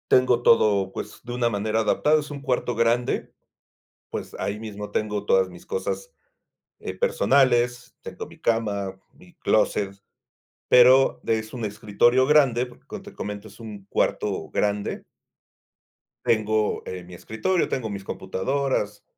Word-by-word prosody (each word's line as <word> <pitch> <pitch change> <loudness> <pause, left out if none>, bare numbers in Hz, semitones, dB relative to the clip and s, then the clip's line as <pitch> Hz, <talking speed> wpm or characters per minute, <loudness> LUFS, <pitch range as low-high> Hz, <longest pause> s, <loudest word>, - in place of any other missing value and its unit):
Tengo 125 -2 +4
todo, 100 -5 +4
pues, 105 - -7
de 120 - -7
una 120 -1 +1
manera 110 +1 -1
adaptada, 150 +7 +3
es 150 0 -7
un 140 -1 -7
cuarto 125 -3 -1
grande, 115 +2 +1 0.8
pues, - - -6
ahí 100 +1 -3
mismo 105 -2 -7
tengo 105 -1 -2
todas 95 -2 +3
mis 90 -1 -13
cosas, 485 - -4 0.7
eh, - - -5
personales, 130 - +2
tengo - - -7
mi - - -16
cama, 100 -4 -1
mi 175 +2 -19
clóset, 100 - 0 0.7
pero 130 +2 +6
de 110 -1 +1
es 110 +2 -11
un 120 -3 -4
escritorio 110 +4 +2
grande 135 -5 +4
porque, 125 - -18
como - - -8
te - - -12
comento, 105 +1 -6
es 105 - -16
un 105 -4 -9
cuarto - - -1
grande. 105 0 -1 1.2
Tengo, 110 -1 +1
eh, 90 -1 -6
mi 90 0 -11
escritorio, 110 - -1
tengo 115 -4 -3
mis 100 -1 -6
computadoras, 105 +2 -2
110 Hz, 145 wpm, -24 LUFS, 105-125 Hz, 1.2 s, pero